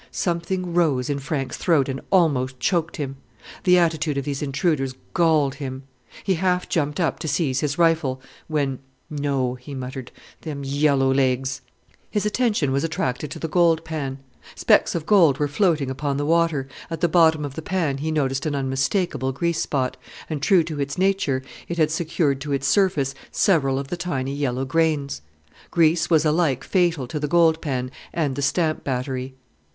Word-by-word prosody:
Something 175 +1 -2
rose 145 -7 +2
in 140 - -2
Frank's 135 -1 -3
throat 155 -7 +2
and 135 -1 -4
almost 130 -8 +2
choked 165 0 0
him. 135 -3 -4 0.5
The 180 -1 +6
attitude 160 -4 +1
of 140 - -2
these 140 -2 -3
intruders 140 -2 0 0.2
galled 155 -5 +3
him. 135 -2 -6 0.4
He 190 - +1
half 180 +1 0
jumped 150 -1 -1
up 165 - 0
to - - -4
seize 140 -3 0
his 145 0 -1
rifle, 160 -6 +2 0.3
when 140 -4 -1 0.3
"No," 140 -4 -1
he 130 +3 -9
muttered: 130 -1 -6 0.3
"Them 145 -3 -5
yellow 140 -1 +2
legs!" 130 0 0 0.5
His 210 -1 -1
attention 210 - +1
was 140 +1 0
attracted 150 -3 -2
to - - -7
the 160 - -3
gold 165 0 +3
pan. 145 -5 -4 0.4
Specks - - +3
of 165 -2 -2
gold 165 -10 +5
were 145 - +1
floating 150 -3 +1
upon 140 +1 -2
the 145 - -1
water; 165 -4 +2 0.2
at 165 -2 -5
the 175 - +4
bottom 160 -2 +4
of 140 - -6
the 160 - -6
pan 160 -6 -1
he 155 +3 -2
noticed 135 -2 0
an 145 - -1
unmistakable 135 - 0
grease 170 +4 -1
spot, 130 -2 -1 0.3
and, 155 -3 -4
true 180 +1 +4
to 155 -3 -4
its 140 0 -3
nature, 185 -9 +1 0.2
it 170 - -4
had 155 -2 +3
secured 155 -4 0
to 145 0 -3
its 135 0 -1
surface 155 -9 +2 0.2
several 135 -8 +2
of 135 0 -4
the 175 - -3
tiny 140 -6 -2
yellow 135 -2 -1
grains. 145 - 0 0.5
Grease 165 -1 +3
was 160 -2 +4
alike 150 -4 +1
fatal 170 -7 +1
to 150 +5 -4
the 150 - -1
gold 165 0 +3
pan 130 -4 -2 0.2
and 145 -5 -1
the 140 - -3
stamp 155 +3 0
battery. 130 0 -3
150 Hz, 180 wpm, -23 LUFS, 135-165 Hz, 0.5 s, The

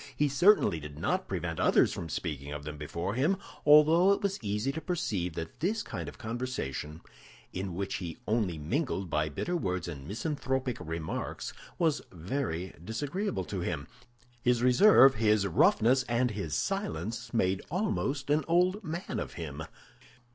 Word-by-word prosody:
He 150 - +2
certainly 170 - +4
did 75 -1 -9
not 80 - -1
prevent - - -3
others - - +4
from 85 - -5
speaking 75 -4 -4
of 75 0 -5
them 75 0 -6
before 85 +6 -4
him, 150 - +2 0.3
although 155 +5 +7
it 200 - -3
was 195 -1 0
easy 105 +4 -1
to 160 +3 -5
perceive 110 - -2
that 80 -1 -6
this 205 +7 0
kind - - -5
of - - -13
conversation, 110 - -4 0.5
in 95 -1 -4
which 100 +1 -2
he 85 -4 -6
only 105 -7 0
mingled 95 - -2
by 75 0 +1
bitter 175 - -2
words 90 - -2
and 70 -5 -7
misanthropic 130 - -2
remarks, 80 0 -4 0.2
was 160 -4 +2
very 90 - -3
disagreeable 115 - -2
to 95 - -4
him. 85 -5 -3 0.6
His 120 0 +2
reserve, 135 +2 +7
his 105 -3 +2
roughness, 115 +7 +4
and 120 +1 +2
his 100 -8 -3
silence 120 - -2
made 95 -5 +1
almost 150 -6 -1
an 150 +1 +3
old 180 +5 +2
man 170 +2 -4
of - - -5
him. 80 -3 -6
115 Hz, 155 wpm, -30 LUFS, -, 0.6 s, although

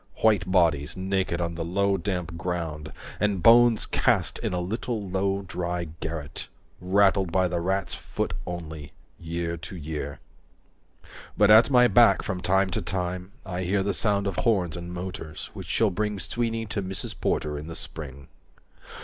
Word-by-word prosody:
White 105 -5 +3
bodies 80 -4 +2
naked 95 -2 -1
on 85 -1 -1
the 85 0 -4
low 100 +4 +1
damp 90 -2 -3
ground 80 -3 -4 0.3
And 100 -4 0
bones 120 -1 +6
cast - - +1
in - - -2
a 90 - -1
little 105 +3 -3
low 95 +1 0
dry 85 -1 -3
garret, 80 -2 -5 0.3
Rattled 95 -1 +3
by 95 0 +3
the 90 -1 -1
rat's 95 +3 -1
foot - - -3
only, 80 -4 -6 0.3
year 85 0 -3
to 95 +4 -8
year. 75 -3 -5 1.2
195 - - -23
But 105 0 +6
at 110 +5 +8
my 125 -2 +6
back 115 -5 +5
from 95 -3 -3
time 95 +1 +2
to 110 - -1
time 90 0 -3
I 90 -1 -3
hear 95 +2 +1
The 100 0 0
sound 100 0 +1
of 95 -3 -2
horns 95 -9 +1
and 85 0 -6
motors, 90 -3 -6
which - - -8
shall 110 -3 +2
bring 105 +2 -1
Sweeney 115 +5 -2
to 105 -1 -3
Mrs. 95 0 -5
Porter 75 -1 0
in 75 - -8
the 85 - -7
spring. 70 -3 -7
90 Hz, 165 wpm, -26 LUFS, 85-100 Hz, 1.2 s, at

